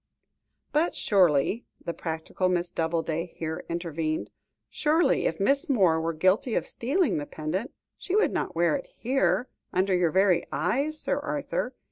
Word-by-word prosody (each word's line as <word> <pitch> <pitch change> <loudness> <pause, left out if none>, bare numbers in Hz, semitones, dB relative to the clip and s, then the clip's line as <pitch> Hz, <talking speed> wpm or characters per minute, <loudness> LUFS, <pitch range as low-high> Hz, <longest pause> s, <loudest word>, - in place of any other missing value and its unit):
"But 315 +4 +1
surely," 185 - +2 0.2
the 170 - -2
practical 160 +3 -2
Miss 175 -1 0
Doubleday 165 +1 -2
here 160 -1 -4
intervened, 165 -2 -2 0.4
"surely, 310 -1 +2
if 160 - -3
Miss 275 - +2
Moore 185 -11 +3
were 165 +1 -1
guilty 190 - +2
of - - 0
stealing 280 - 0
the 145 - -5
pendant, 175 - -3 0.3
she 380 - -2
would 430 - +3
not - - -2
wear 170 -2 +3
it - - -5
here, 235 -3 0 0.2
under 190 +1 +1
your 180 -2 +3
very 185 0 +3
eyes, 275 - 0
Sir 285 - 0
Arthur. 285 -3 -3
185 Hz, 150 wpm, -27 LUFS, 165-265 Hz, 0.4 s, Moore